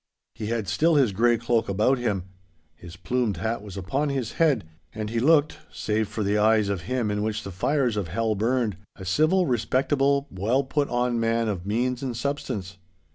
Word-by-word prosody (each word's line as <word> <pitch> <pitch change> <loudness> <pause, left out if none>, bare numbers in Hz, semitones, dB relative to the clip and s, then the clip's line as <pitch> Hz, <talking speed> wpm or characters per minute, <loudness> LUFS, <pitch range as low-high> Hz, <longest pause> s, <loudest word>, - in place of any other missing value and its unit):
He 110 - -5
had 115 -3 -2
still 165 +1 +2
his 135 -7 +4
grey 120 +4 +3
cloak 115 -1 0
about 110 +7 +2
him. 105 -7 -1 0.5
His 85 +1 -11
plumed 120 0 -1
hat 110 +6 -2
was 100 -2 -9
upon 135 +11 -1
his 135 -5 -2
head, 135 - +3 0.3
and 110 -1 -4
he 115 - 0
looked, 150 +3 +3
save 110 0 -1
for 105 +1 -3
the 100 +1 +1
eyes 110 -1 +3
of 95 +1 -3
him 125 -5 0
in 105 0 -1
which 110 0 -2
the 100 - -6
fires 125 - 0
of 100 -4 -1
hell 110 +6 0
burned, 115 -2 0 0.2
a 95 - -9
civil, 155 - +3
respectable, 135 +3 +1
well 110 +9 +1
put 140 +2 -1
on 120 -1 0
man 115 0 +1
of 95 -3 -3
means 125 +4 0
and 125 -4 -3
substance. 105 -8 -4
115 Hz, 190 wpm, -25 LUFS, 105-130 Hz, 0.5 s, his